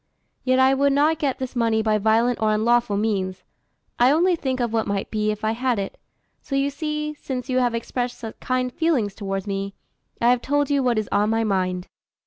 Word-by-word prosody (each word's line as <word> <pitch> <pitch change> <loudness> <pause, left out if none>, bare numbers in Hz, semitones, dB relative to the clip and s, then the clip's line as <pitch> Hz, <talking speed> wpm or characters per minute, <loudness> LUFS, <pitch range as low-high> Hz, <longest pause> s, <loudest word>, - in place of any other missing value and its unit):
Yet 255 0 +2
I 260 +1 +5
would 280 +1 +2
not 300 +3 +3
get 280 -4 0
this 260 0 -5
money 225 -2 +2
by 215 -1 +2
violent 225 +3 +2
or 215 -1 +3
unlawful 235 -1 +2
means; 190 -3 -1 0.6
I 245 +1 +6
only 345 +5 +3
think 260 -5 -2
of 240 -2 -1
what 225 -1 0
might 200 -1 -2
be 215 -1 0
if 210 0 -3
I 220 - +2
had 245 +1 0
it. 195 -1 -4 0.4
So 275 - -4
you 275 +1 +1
see, 300 +1 -3
since 260 -3 -6
you 255 0 +2
have 245 -2 +1
expressed 245 +1 -3
such 225 -2 -8
kind 255 -1 -1
feelings 275 -12 +1
towards 195 -2 -4
me, 195 -1 -3 0.4
I 240 +1 +4
have 250 -1 +2
told 290 +2 0
you 280 -1 +3
what 245 -3 +1
is 215 -1 -1
on 210 +1 +2
my 225 0 +1
mind." 185 -3 -1
240 Hz, 215 wpm, -23 LUFS, 215-265 Hz, 0.6 s, I